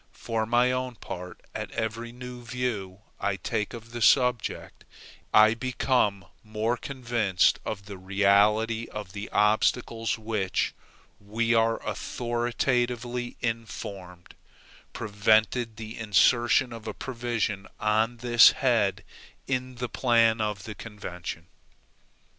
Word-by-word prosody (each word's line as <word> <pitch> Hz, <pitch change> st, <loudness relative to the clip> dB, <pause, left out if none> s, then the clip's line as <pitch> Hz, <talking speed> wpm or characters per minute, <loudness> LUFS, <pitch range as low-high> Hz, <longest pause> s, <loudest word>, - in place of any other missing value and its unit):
For 110 Hz, -1 st, -2 dB
my 120 Hz, +2 st, +3 dB
own 130 Hz, -1 st, -2 dB
part, 90 Hz, -4 st, -8 dB
at -, -, -5 dB
every 115 Hz, +1 st, -3 dB
new 125 Hz, 0 st, -9 dB
view 110 Hz, -6 st, -4 dB, 0.2 s
I 100 Hz, -1 st, 0 dB
take 105 Hz, +2 st, -2 dB
of 115 Hz, 0 st, -11 dB
the 120 Hz, 0 st, -6 dB
subject, 125 Hz, -2 st, +2 dB, 0.5 s
I 110 Hz, +1 st, +7 dB
become 125 Hz, -4 st, 0 dB, 0.2 s
more 110 Hz, +2 st, -1 dB
convinced 115 Hz, -7 st, +1 dB
of 100 Hz, -3 st, -5 dB
the 100 Hz, -2 st, -9 dB
reality 105 Hz, +4 st, +2 dB
of 105 Hz, -3 st, -8 dB
the 100 Hz, +1 st, -6 dB
obstacles 115 Hz, +2 st, +1 dB
which, 110 Hz, -4 st, -1 dB, 0.5 s
we 115 Hz, +3 st, 0 dB
are 115 Hz, 0 st, +3 dB
authoritatively 120 Hz, 0 st, -1 dB
informed, 100 Hz, -6 st, -5 dB, 0.6 s
prevented 110 Hz, +2 st, +1 dB
the 110 Hz, 0 st, -8 dB
insertion 120 Hz, +4 st, +3 dB
of 115 Hz, -1 st, -9 dB
a 110 Hz, -, -4 dB
provision 115 Hz, -6 st, -3 dB
on 110 Hz, +3 st, +1 dB
this 120 Hz, 0 st, +7 dB
head 120 Hz, -9 st, +1 dB, 0.4 s
in 130 Hz, -1 st, -2 dB
the 125 Hz, 0 st, -3 dB
plan 115 Hz, -3 st, +3 dB
of 105 Hz, -3 st, -2 dB
the 110 Hz, -, -6 dB
convention. 90 Hz, -7 st, -7 dB
115 Hz, 115 wpm, -27 LUFS, 105-120 Hz, 0.6 s, I